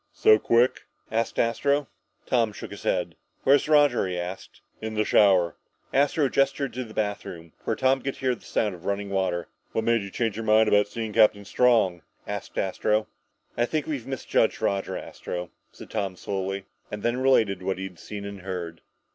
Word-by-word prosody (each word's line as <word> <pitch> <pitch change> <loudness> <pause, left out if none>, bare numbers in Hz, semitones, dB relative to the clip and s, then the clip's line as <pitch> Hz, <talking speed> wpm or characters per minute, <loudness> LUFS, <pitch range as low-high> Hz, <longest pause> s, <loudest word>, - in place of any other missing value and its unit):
"So 110 0 +5
quick?" 120 +3 +3 0.3
asked 115 +1 -1
Astro. 140 +5 +1 0.4
Tom 115 -4 +1
shook - - -8
his - - -8
head. - - -1 0.3
"Where's 140 +2 +4
Roger?" 145 -8 +4
he 90 -1 -3
asked. 90 +2 -6 0.2
"In 110 0 -4
the 110 0 +1
shower." 95 -5 +4 0.4
Astro 145 +1 +3
gestured 135 -1 +1
to 130 +2 -3
the 110 -3 -12
bathroom, 90 -6 -4
where - - 0
Tom 130 0 +2
could 135 +1 -3
hear 130 -1 0
the - - -10
sound 105 -3 -1
of 90 0 -12
running 100 0 -2
water. 95 -3 -1 0.3
"What 110 - 0
made 115 0 +2
you 100 - -6
change 110 0 -2
your 115 - -3
mind 110 0 +5
about 105 -1 +4
seeing 110 0 -5
Captain 100 -1 +4
Strong?" 110 -7 +3 0.2
asked - - -6
Astro. 105 +3 0 0.5
"I 120 - +2
think 155 +2 -1
we've 140 -7 -4
misjudged 130 -4 0
Roger, 100 -3 -1
Astro," 90 0 -6 0.2
said - - -13
Tom 100 -4 -2
slowly. 95 +1 -3 0.2
And 105 0 -6
then 120 +1 +1
related 110 -8 +3
what 95 0 -2
he 95 - -5
had 90 -3 -8
seen 105 -1 -7
and 100 -1 -7
heard. 90 -3 -5
110 Hz, 185 wpm, -26 LUFS, 95-120 Hz, 0.5 s, So